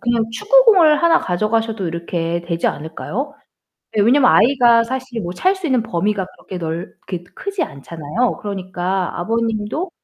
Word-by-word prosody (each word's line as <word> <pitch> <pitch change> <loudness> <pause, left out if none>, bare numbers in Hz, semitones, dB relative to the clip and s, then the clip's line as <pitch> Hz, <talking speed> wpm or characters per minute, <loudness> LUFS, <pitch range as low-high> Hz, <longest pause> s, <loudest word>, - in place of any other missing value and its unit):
그냥 235 -2 +1
축구공을 390 - +5
하나 335 0 +5
가져가셔도 215 +2 -1
이렇게 170 0 -2
되지 170 -1 -2
않을까요? 210 - -4 0.6
네, 215 - +1
왜냐면 255 +4 +5
아이가 240 -2 +5
사실 255 -1 -4
뭐 175 0 -4
찰 375 - +1
수 380 -3 -5
있는 255 -6 +2
범위가 200 -1 -1
그렇게 185 - -8
넓 165 0 -5
그렇게 180 -3 -5
크지 395 -3 -3
않잖아요. 165 - -3
그러니까 185 -2 -3
아버님도 225 - -2
225 Hz, 360 characters per minute, -19 LUFS, 175-260 Hz, 0.6 s, 축구공을